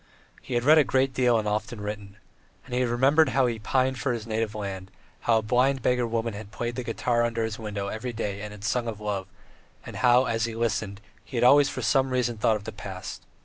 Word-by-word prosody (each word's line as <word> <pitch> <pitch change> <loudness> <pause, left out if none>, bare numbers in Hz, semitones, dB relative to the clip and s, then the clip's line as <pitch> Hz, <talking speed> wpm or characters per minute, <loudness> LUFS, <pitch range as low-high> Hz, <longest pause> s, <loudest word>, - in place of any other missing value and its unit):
He 125 - -5
had 120 - +1
read 155 +4 +7
a - - +6
great 130 0 +1
deal 125 -3 +3
and 110 -1 -1
often 105 +2 -2
written. 105 -1 -6 0.5
And 125 - -10
he 125 +1 +2
remembered 135 +6 +3
how 135 0 +2
he 120 - +1
had 110 -1 -10
pined 130 +1 +1
for 125 0 0
his 115 -2 -5
native 110 -1 -2
land, 95 -2 -5 0.3
how 115 -1 +2
a - - +1
blind 125 +3 +2
beggar 125 -1 +2
woman 115 0 -2
had 100 0 -8
played 120 +2 -4
the 125 - -3
guitar 120 +1 0
under 115 -1 0
his 110 0 -4
window 105 -2 -4
every 110 +5 -4
day 105 -3 -4
and 105 -1 -8
sung 120 +2 0
of 110 -2 -4
love, 100 -3 -3 0.6
and - - -8
how, 125 +1 +5
as 115 -2 0
he 115 -1 -5
listened, 105 -3 -2 0.2
he 125 - -7
had - - +2
always 140 +3 +6
for - - -5
some 135 -1 +2
reason 120 -3 -1
thought 110 +1 +3
of 105 - -5
the 110 - -6
past. 100 -3 -8
115 Hz, 235 wpm, -26 LUFS, 105-125 Hz, 0.6 s, read